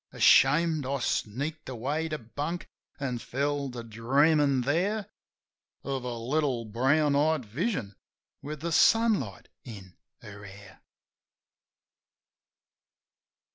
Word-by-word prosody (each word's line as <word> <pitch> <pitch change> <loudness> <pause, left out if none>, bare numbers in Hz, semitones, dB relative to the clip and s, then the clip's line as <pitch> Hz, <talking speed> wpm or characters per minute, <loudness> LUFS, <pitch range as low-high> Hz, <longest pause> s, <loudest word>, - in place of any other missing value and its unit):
Ashamed, 155 +3 +4
I 135 +2 -2
sneaked 140 +5 -3
away 140 +7 -2
to 155 - -3
bunk; 145 +8 -5 0.3
an' 130 -4 -3
fell 140 +3 -2
to 120 -2 -7
dreamin' 135 +5 +2
there 185 - 0 0.8
Of 135 -2 -3
a 120 -1 -4
little 130 0 -1
brown 140 +7 +2
eyed 150 -2 +1
vision 115 - -3 0.5
with 150 +1 -7
the 170 +1 -3
sunlight 210 - +2
in 100 -7 -11 0.3
her 100 -1 -11
hair. 100 0 -14
140 Hz, 100 wpm, -28 LUFS, 115-155 Hz, 0.8 s, Ashamed